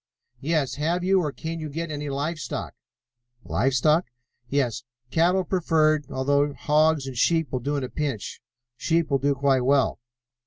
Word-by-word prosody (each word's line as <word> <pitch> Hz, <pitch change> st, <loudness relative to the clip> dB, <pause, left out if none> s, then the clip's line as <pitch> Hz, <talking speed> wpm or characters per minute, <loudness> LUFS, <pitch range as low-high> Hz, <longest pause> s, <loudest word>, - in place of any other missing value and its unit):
"Yes. 145 Hz, -1 st, -1 dB
Have 170 Hz, +4 st, 0 dB
you, 190 Hz, +1 st, +3 dB
or 150 Hz, -4 st, -2 dB
can 165 Hz, +3 st, -5 dB
you 155 Hz, -1 st, -5 dB
get, 165 Hz, +2 st, -4 dB
any 145 Hz, -1 st, -4 dB
live 145 Hz, +4 st, -2 dB
stock?" -, -, -5 dB, 0.7 s
"Live 130 Hz, +6 st, 0 dB
stock?" 155 Hz, +7 st, +3 dB, 0.4 s
"Yes. 125 Hz, -5 st, 0 dB, 0.3 s
Cattle 180 Hz, +3 st, +3 dB
preferred, 155 Hz, -5 st, +2 dB
although 140 Hz, +2 st, +1 dB
hogs 155 Hz, -1 st, +2 dB
or 135 Hz, -, -5 dB
sheep 160 Hz, +5 st, +1 dB
will 130 Hz, -, -1 dB
do 145 Hz, +4 st, -2 dB
at 140 Hz, -, -2 dB
a 125 Hz, -, -4 dB
pinch. 140 Hz, -9 st, -4 dB, 0.3 s
Sheep 165 Hz, +2 st, 0 dB
will 135 Hz, -, +3 dB
do 140 Hz, +1 st, +1 dB
quite 135 Hz, -1 st, +2 dB
well." 135 Hz, +1 st, +2 dB
150 Hz, 165 wpm, -25 LUFS, 135-160 Hz, 0.7 s, you